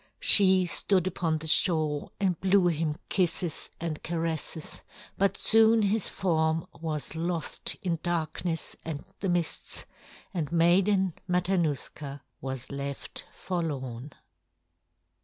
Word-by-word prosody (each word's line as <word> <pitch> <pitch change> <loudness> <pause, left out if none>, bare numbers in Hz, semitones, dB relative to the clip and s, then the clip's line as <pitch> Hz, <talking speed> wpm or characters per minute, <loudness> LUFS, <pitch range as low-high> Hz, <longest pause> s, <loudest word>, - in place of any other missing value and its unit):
She 190 -2 +5
stood 185 +1 +2
upon 165 -3 0
the 160 - -8
shore 155 -3 +2
and 185 -4 0
blew 190 -1 +4
him 155 -2 -1
kisses 175 -3 +1
and 160 -2 -4
caresses, 165 -1 -2 0.3
but 195 0 +2
soon 225 0 +5
his 205 0 +2
form 160 -3 0
was 155 -2 -4
lost 165 0 -1
in 170 -3 0
darkness 170 -1 -2
and 155 -3 -5
the 195 - -1
mists, 175 -2 -1 0.5
and 160 -6 -2
Maiden 185 +2 +3 0.2
Matanuska 160 -6 -1 0.2
was 130 -1 -3
left 140 0 -5
forlorn. 145 -7 -4
165 Hz, 110 wpm, -28 LUFS, 155-185 Hz, 0.5 s, She